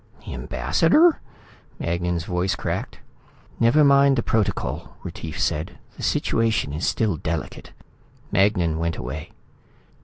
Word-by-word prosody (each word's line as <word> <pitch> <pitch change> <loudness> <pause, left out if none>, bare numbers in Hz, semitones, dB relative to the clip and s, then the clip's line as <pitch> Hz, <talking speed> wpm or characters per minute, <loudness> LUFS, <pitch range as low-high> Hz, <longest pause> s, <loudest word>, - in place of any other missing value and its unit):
"The - - -6
ambassador?" 165 - +3 0.6
Magnan's 85 0 -1
voice 90 +1 0
cracked. - - -4 0.6
"Never 120 +6 +5
mind 140 -1 +5
the 120 - 0
protocol," 110 -3 -1
Retief - - -6
said. 75 +3 -1 0.2
"The - - -11
situation 110 -10 0
is 80 +4 -2
still 105 -7 0
delicate." 80 +2 -5 0.6
Magnan 90 -5 +2
went 85 0 -1
away. 75 +5 -6
90 Hz, 115 wpm, -23 LUFS, 80-115 Hz, 0.6 s, Never